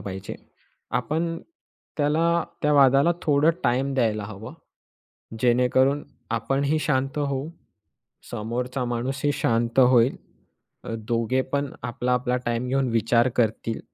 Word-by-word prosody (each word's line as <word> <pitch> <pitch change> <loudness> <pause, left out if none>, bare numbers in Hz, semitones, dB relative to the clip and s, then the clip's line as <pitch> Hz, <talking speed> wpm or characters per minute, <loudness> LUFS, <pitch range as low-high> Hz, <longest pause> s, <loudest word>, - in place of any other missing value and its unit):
पाहिजे. 95 0 -6 0.6
आपण 160 +7 -1 0.6
त्याला 165 +3 +2 0.2
त्या 150 - +3
वादाला 140 +3 +5
थोडं 150 +1 +3
टाईम 130 +3 +1
द्यायला 110 -5 0
हवं. 110 +6 -9 0.9
जेणेकरून 125 +4 +3 0.3
आपणही 135 +6 0
शांत 135 -1 -1
होऊ, 140 0 -2 0.8
समोरचा 125 +4 -3
माणूसही 130 +4 -1
शांत 115 +2 0
होईल, 125 -1 +5 0.7
अ, 115 - -5
दोघे 120 +2 +1
पण 140 -1 0
आपला-आपला 125 +1 -1
टाईम 120 +1 -1
घेऊन 135 0 +1
विचार 115 +2 +2
करतील, 115 0 0
125 Hz, 110 wpm, -24 LUFS, 115-140 Hz, 0.9 s, वादाला